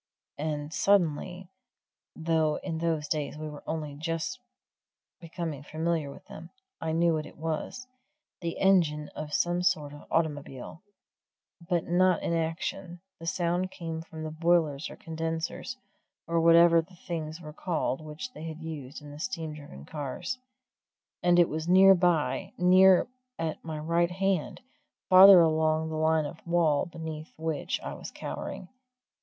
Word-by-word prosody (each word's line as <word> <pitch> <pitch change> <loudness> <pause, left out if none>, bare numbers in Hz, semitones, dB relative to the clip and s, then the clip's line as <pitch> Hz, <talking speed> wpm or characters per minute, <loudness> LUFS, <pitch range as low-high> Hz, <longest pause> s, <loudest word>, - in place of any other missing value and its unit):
And 150 0 -3
suddenly 180 -1 +1 0.6
though 160 -2 +1
in 165 -3 -3
those 160 -3 -1
days 150 -1 -2
we 155 0 -5
were 150 -1 -8
only 155 -2 -3
just 165 - -3 0.8
becoming 165 -4 -5
familiar 160 0 -2
with 140 - -12
them 165 +2 -10 0.3
I 160 - -1
knew 165 +1 +3
what 155 -1 -2
it - - -15
was 165 - -4 0.5
the 170 -1 -4
engine 160 -6 +3
of 155 -1 -7
some 175 +3 +1
sort 155 -6 0
of 145 - -12
automobile; 150 -2 -2 0.9
but 175 -2 +1
not 180 +1 +3
in - - 0
action; 170 +2 -3 0.2
the 165 - -8
sound 175 +1 0
came 165 -3 -5
from 160 -1 -9
the 155 - -4
boilers 160 -3 +1
or - - -9
condensers, 165 +9 -4 0.5
or 165 0 +1
whatever 170 0 +7
the 180 +3 -17
things 160 -2 -5
were 155 -3 -9
called 160 -5 -2
which 155 +12 -7
they - - -10
used 155 -4 -7
in 145 - -10
the 145 - -10
steam 160 -6 -4
driven 145 - -11
cars. 150 - -5 0.8
And 175 0 +4
it 175 -1 +6
was 155 +2 -4
near 190 +2 +8
by 175 -4 +1
near 185 +2 +6 0.3
at 160 -1 -3
my 160 -1 -5
right 170 +3 +1
hand, 190 - -1 0.5
farther 190 0 +10
along 160 0 +2
the 160 - -4
line 160 0 +2
of 150 +3 -6
the - - -12
wall 165 -2 +2
beneath 160 -2 -7
which 160 -1 -2
I - - -5
was - - -8
cowering. 180 - -6
165 Hz, 150 wpm, -28 LUFS, 155-175 Hz, 0.9 s, farther